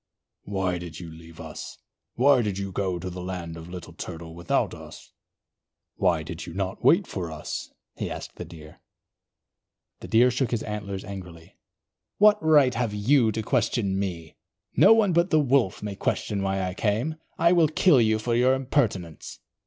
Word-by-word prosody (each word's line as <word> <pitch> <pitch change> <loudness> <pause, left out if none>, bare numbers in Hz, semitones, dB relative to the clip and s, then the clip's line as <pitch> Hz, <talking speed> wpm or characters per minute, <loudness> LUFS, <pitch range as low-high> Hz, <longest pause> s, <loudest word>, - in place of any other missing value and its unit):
"Why 95 -3 -1
did 85 -2 -8
you 85 -2 -8
leave 80 0 -13
us? 80 -1 -8 0.4
Why 135 +1 +5
did 105 -4 -2
you 100 -1 -4
go 95 -2 -1
to 90 +2 -6
the 90 0 -6
land 90 -2 -5
of 80 +1 -10
Little 90 -2 -9
Turtle 80 -2 -8
without 85 +1 0
us? - - -12 0.8
Why 85 -4 +1
did 85 +2 -7
you 85 - -8
not 95 -1 -3
wait 180 +3 +5
for 90 - -5
us?" 75 -1 -6 0.2
he - - -4
asked - - -7
the - - -5
Deer. 75 -2 -13 1.2
The - - -9
Deer 120 +3 +5
shook 125 0 0
his 115 -2 -2
antlers 100 -2 -5
angrily. 90 -5 -10 0.6
"What 210 -2 +5
right 145 -5 +5
have 115 -3 -1
you 115 +2 +3
to 110 +1 -3
question 105 -5 0
me? 85 -5 -5 0.4
No - - +7
one 220 -5 +5
but 170 +2 +3
the 155 - +4
Wolf 135 -10 +1
may 105 -1 -4
question 100 +1 -1
why 95 0 -1
I 90 0 -2
came. 115 +11 -1 0.2
I 170 +1 +4
will 170 -3 +5
kill 155 -2 +4
you 110 -1 +3
for 115 +2 -2
your 125 +2 +4
impertinence." 115 - -2
100 Hz, 175 wpm, -26 LUFS, 90-125 Hz, 1.2 s, No